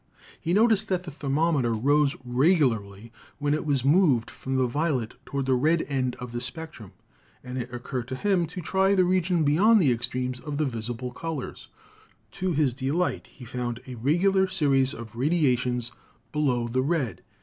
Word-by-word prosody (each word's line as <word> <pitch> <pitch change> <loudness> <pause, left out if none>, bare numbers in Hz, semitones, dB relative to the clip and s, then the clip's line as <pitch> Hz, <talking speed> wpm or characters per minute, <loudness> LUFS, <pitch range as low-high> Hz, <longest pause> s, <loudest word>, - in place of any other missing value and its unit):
He 165 - -3
noticed 220 +1 +4
that 185 -3 -1
the 175 - -7
thermometer 140 -4 0
rose 145 +5 +2
regularly 120 - +1 0.3
when 145 0 0
it 155 0 -2
was 135 -3 +1
moved 145 -7 +3
from 130 0 -5
the 130 -1 +3
violet 130 -3 -1
toward 140 -1 -2
the 130 - +2
red 155 +6 +2
end 130 -3 -1
of 125 -1 -8
the 120 0 -4
spectrum, 160 - -7 0.5
and 125 0 -7
it 120 0 -5
occurred 120 0 -5
to 130 - -4
him 185 +1 +1
to 180 +3 -7
try 190 +4 +2
the 185 - +4
region 180 -2 +2
be 145 0 +3
yond 215 +7 +5
the 145 -9 +4
extremes 125 +1 -2
of 145 0 -5
the 155 - +1
visible 120 0 -4
colors. 155 +1 -6 0.6
To 185 0 -2
his 145 -5 +2
delight 140 +7 -1
he 125 - -13
found 120 0 -4
a 130 - -8
regular 175 - +2
series 140 -8 +2
of 115 -1 -9
radiations 125 -4 +1 0.4
below 130 -6 0
the 130 +2 0
red. 140 -3 -1
140 Hz, 175 wpm, -26 LUFS, 125-165 Hz, 0.6 s, yond